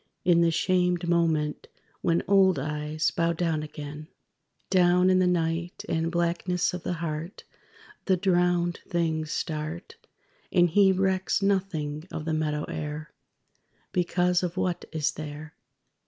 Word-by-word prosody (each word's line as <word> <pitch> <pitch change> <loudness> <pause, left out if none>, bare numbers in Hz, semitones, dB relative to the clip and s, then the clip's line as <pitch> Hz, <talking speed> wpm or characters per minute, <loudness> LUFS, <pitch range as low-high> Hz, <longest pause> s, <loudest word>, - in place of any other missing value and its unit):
In 170 -1 +5
the 170 - +4
shamed 180 +1 +1
moment, 160 -3 +1 0.3
when 170 0 +1
Old 190 -3 +5
eyes 150 +2 -1
bow 170 0 +1
down 165 -2 -1
again? 150 0 -8 0.6
_Down 180 0 +4
in 185 - +4
the 185 - +3
night 170 0 -1
and 165 0 -1
blackness 175 +1 0
of 180 - -4
the 180 - -2
heart, 155 +4 -5 0.6
The 190 -2 +3
drowned 175 -2 +1
things 160 -2 -1
start. 160 - -4 0.5
And 175 -2 +4
he 195 +2 +5
recks 190 +1 +1
nothing 175 -6 -1
of 155 - -5
the 160 - -1
meadow 150 -1 -1
air, 150 0 -5 0.8
Because 180 0 +1
of 180 0 -3
what 180 -1 -1
is 160 -1 0
There. 150 0 -8
170 Hz, 135 wpm, -27 LUFS, 155-180 Hz, 0.8 s, In